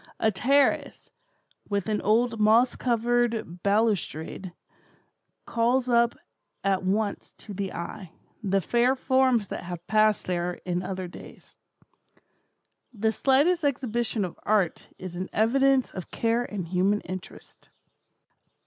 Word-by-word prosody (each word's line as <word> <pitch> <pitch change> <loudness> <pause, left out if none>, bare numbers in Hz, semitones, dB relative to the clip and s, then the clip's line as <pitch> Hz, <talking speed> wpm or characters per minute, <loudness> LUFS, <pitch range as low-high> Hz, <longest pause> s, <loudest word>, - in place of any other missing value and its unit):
A 220 - +3
terrace, 275 +8 +1 0.6
with 200 -1 -1
an 215 -1 0
old 225 +2 +2
moss 225 +4 +4
covered 235 -6 0
balustrade, 200 -4 0 0.9
calls 240 +2 +1
up 235 -1 +3 0.5
at 195 -1 +1
once 200 +2 -2
to 210 - -10
the 195 0 -3
eye, 170 +1 -7 0.3
the 195 -2 +1
fair 240 +7 +2
forms 260 -5 +2
that - - -5
have 175 -1 -7
passed 215 -1 +2
there 180 0 -1
in 180 -1 -1
other 185 0 -4
days. 175 - -13 1.4
The 220 -1 0
slightest 290 +9 +2
exhibition 240 -6 -1
of 175 - -9
art 205 -5 0
is 185 -1 -7
an 185 +1 -4
evidence 265 +4 +3
of 185 -3 -7
care 230 +1 0
and 195 -7 -5
human 190 +4 +1
interest." 185 +1 -10
215 Hz, 120 wpm, -26 LUFS, 185-240 Hz, 1.4 s, moss